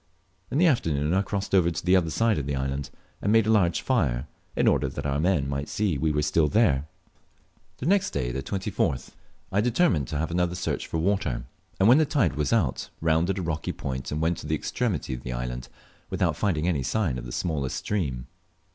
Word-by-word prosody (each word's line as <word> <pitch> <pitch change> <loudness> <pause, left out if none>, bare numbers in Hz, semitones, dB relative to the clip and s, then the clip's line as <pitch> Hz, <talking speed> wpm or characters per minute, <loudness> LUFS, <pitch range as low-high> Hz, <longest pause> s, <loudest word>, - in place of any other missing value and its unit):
In - - -1
the 175 - +5
afternoon 80 - +2
I 95 - +3
crossed 100 0 -3
over 90 -3 +5
to 85 0 -5
the 90 +1 +5
other 85 -3 +2
side 115 +3 +2
of 70 - -4
the 70 - -1
island, 70 +1 -2 0.3
and 100 - +1
made 115 0 +5
a 110 - +2
large 90 -6 +3
fire, 70 - +1 0.3
in - - +2
order - - +3
that - - -6
our 70 0 0
men 80 -4 +2
might 70 +1 -3
see 100 -6 0
we 75 +3 +1
were 75 0 0
still 75 +1 +3
there. 75 - +2 0.9
The - - -6
next 195 +3 +3
day 60 -2 -2
(24th) 70 -2 -2 0.4
I 100 - +2
determined 115 - +2
to 75 - -3
have 80 +3 -2
another 90 0 0
search 90 - -2
for - - -2
water; 80 -9 0 0.3
and 95 - +5
when 125 +6 +7
the 155 - +4
tide 135 - +2
was 75 0 -1
out 95 - +1
rounded 80 +4 +1
a 95 - -2
rocky 80 -2 -2
point 65 -1 -5
and 75 - -2
went 80 +2 0
to - - -8
the 80 - +1
extremity 100 - -2
of 60 - -5
the 65 - -5
island - - -4 0.4
without - - 0
finding 85 -5 0
any 80 -6 +1
sign 65 - 0
of - - -8
the - - -7
smallest 70 -3 -2
stream. 70 -12 -2
80 Hz, 215 wpm, -26 LUFS, 70-100 Hz, 0.9 s, when